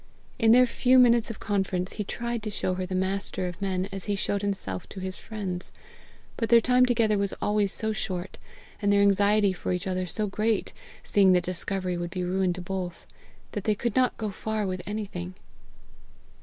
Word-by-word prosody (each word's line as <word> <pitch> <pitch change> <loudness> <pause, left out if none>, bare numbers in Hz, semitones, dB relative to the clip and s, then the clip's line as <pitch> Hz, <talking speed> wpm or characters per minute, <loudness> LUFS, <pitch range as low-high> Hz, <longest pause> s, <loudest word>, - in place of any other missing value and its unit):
In 225 -2 +4
their 250 +2 +7
few 250 +1 +3
minutes 240 -2 +5
of 225 - -6
conference, 190 -3 -1
he 210 - -3
tried 235 +3 -3
to 215 - -4
show 190 -2 -1
her 185 0 -3
the 185 - -3
Master 190 0 -1
of 175 +1 -7
men 190 -1 -1
as 195 -1 -4
he 205 - 0
showed 200 0 -1
himself 190 - -3
to 195 - -8
his 185 0 -4
friends; 190 -5 -5 0.7
but 230 - -1
their 235 0 +8
time 250 +2 +4
together 225 -4 +2
was 200 -1 -1
always 205 -2 +1
so 220 -1 0
short, 185 -4 -4 0.4
and 205 -1 +2
their 200 0 +4
anxiety 200 0 +4
for 180 - -4
each 180 +2 -2
other 185 -1 -2
so 215 +4 -1
great, 215 +2 -1 0.3
seeing 195 -2 +4
that 180 -1 +3
discovery 185 0 -2
would 175 0 -3
be 180 0 -3
ruin 185 +1 +1
to 180 - -7
both, 185 -2 -5 0.5
that 205 - -5
they 215 - +2
could 235 +1 -2
not 255 -1 +2
go 215 -2 -3
far 215 +1 -2
with 185 -1 -3
anything. 195 -4 -5
200 Hz, 195 wpm, -27 LUFS, 185-215 Hz, 0.7 s, their